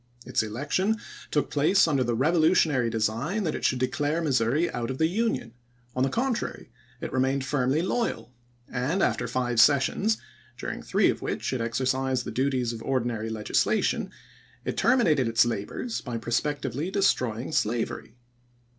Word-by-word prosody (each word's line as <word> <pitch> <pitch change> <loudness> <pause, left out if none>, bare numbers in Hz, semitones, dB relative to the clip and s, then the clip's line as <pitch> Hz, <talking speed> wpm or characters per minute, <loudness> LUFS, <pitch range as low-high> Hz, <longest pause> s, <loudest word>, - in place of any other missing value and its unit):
Its - - +1
election 145 - -1 0.3
took 150 - 0
place 155 +6 +4
under 140 -5 +2
the 120 -1 0
revolutionary 155 -2 +3
design 115 - -1
that 160 - -1
it - - -5
should 130 - +2
declare 145 +5 0
Missouri 140 +1 +2
out 120 -1 -3
of 130 - -3
the 160 - +3
Union; 190 - -1 0.4
on 130 - -1
the 135 - +3
contrary, 245 - -2 0.3
it - - -5
remained 130 +1 +1
firmly 140 +2 +1
loyal; 190 - -2 0.3
and 145 +10 -1
after - - 0
five 120 -2 0
sessions, 150 +10 +3 0.4
during - - -5
three - - +2
of - - -7
which - - -2
it 125 - -1
exercised 130 +2 0
the - - -4
duties 130 -3 0
of 115 - -7
ordinary 120 -3 -1
legislation, 110 -1 0 0.6
it - - -2
terminated 185 - +3
its 115 +1 +4
labors 120 - -3
by 120 -2 -4
prospectively 140 +5 -2
destroying 130 - 0
slavery. 115 -3 -1
130 Hz, 150 wpm, -27 LUFS, 120-160 Hz, 0.6 s, place